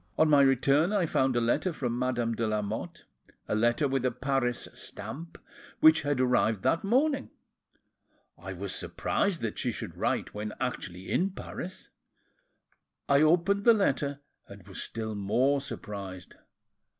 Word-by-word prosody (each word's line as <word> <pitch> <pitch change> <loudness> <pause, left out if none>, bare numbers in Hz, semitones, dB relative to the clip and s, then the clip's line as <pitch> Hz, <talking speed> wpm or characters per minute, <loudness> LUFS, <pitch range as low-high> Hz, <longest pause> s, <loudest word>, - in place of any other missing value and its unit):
On 155 - +4
my 145 -1 +7
return 140 - +3
I 200 -4 +2
found 130 -4 +1
a - - +3
letter 120 +10 +1
from 125 -6 -3
Madame 120 -2 0
de 115 0 -1
Lamotte, 105 -1 -3 0.4
a - - -1
letter 120 +7 +2
with 135 -1 -1
a 130 - +3
Paris 125 -1 -1
stamp, 165 +4 -8 0.4
which 160 0 +7
had 145 -3 -1
arrived 120 -5 +2
that 165 - +2
morning. 270 +7 +1 1.1
I - - -8
was - - -4
surprised 195 -5 -1
that 110 -2 -3
she 125 - 0
should 85 -6 -6
write, 120 +7 -1
when 105 +1 -4
actually 90 +2 -4
in 190 +3 +2
Paris; 185 -1 -7 1.2
I 140 0 +4
opened 175 +6 +3
the 235 0 +7
letter, 145 -7 0 0.3
and 100 -1 -13
was 95 - -6
still 110 -1 -4
more 125 +8 +1
surprised. 100 -8 -7
130 Hz, 150 wpm, -29 LUFS, 110-155 Hz, 1.2 s, my